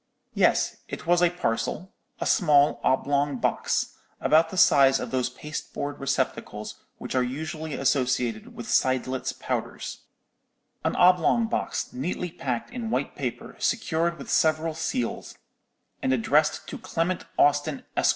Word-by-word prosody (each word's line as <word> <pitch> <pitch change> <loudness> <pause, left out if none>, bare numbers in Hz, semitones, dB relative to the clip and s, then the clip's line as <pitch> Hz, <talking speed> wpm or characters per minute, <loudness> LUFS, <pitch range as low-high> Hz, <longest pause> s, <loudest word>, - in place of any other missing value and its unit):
"Yes, - - +2
it - - -7
was 175 +1 +3
a 175 - +5
parcel—a 175 +2 -4
small 145 -4 +4
oblong 140 +1 +1
box—about 160 +5 0
the 185 - -7
size 135 -5 +6
of - - -5
those 130 -1 0
pasteboard 145 +1 -6
receptacles 135 - -3 0.2
which - - -6
are 130 - +3
usually 155 +5 -4
associated 125 -4 0
with 120 - -7
Seidlitz 130 0 +1
powders—an - - -6
oblong 180 +6 +4
box, 225 - -2
neatly 170 +6 -3
packed 125 - -4
in 240 -2 -4
white - - -1
paper, - - -5
secured 170 -6 0
with 140 - -7
several 160 0 +2
seals, 155 -7 -3 0.6
and 130 - +1
addressed 145 +5 +2
to - - -6
Clement 170 +2 -2
Austin, 145 0 +2
Esq. - - +3
150 Hz, 125 wpm, -26 LUFS, 130-170 Hz, 0.6 s, size